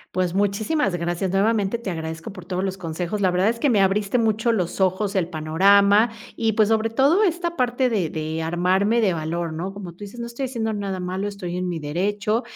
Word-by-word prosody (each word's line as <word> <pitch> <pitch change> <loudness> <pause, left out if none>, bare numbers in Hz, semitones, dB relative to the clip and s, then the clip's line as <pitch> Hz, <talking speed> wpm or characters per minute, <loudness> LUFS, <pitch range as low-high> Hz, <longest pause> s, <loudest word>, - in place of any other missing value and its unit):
Pues, 180 -2 0
muchísimas 205 - 0
gracias, 175 +2 -2
nuevamente 205 +2 +1
te 230 -5 -5
agradezco 160 +1 -6
por 185 - -10
todos 185 +1 -2
los 190 0 -3
consejos. 175 +4 -3
La 190 - +3
verdad 180 +2 +2
es 230 +1 0
que 285 - +2
me 220 -5 +3
abriste 200 +3 +2
mucho 225 0 +2
los 190 -3 -1
ojos, 190 +2 +1
el 185 -4 0
panorama 200 +7 +4 0.3
y, 225 -1 0
pues, 215 0 +3
sobre 225 0 +2
todo 280 - +3
esta 345 -2 0
parte 250 -1 +1
de 190 -8 0
de 160 +1 -3
armarme 185 +7 +1
de 195 -5 +2
valor, 165 +1 -3
¿no?, 175 +5 -4
como 195 -3 -8
tú 170 - -21
dices, 205 +4 -11
no 235 - -4
estoy 235 +3 -4
haciendo 230 -4 -2
nada 200 -2 -3
malo, 185 +2 -3
estoy 185 -3 -5
en 180 0 -2
mi 175 - -2
derecho. 200 +8 -1
195 Hz, 215 wpm, -23 LUFS, 175-225 Hz, 0.3 s, panorama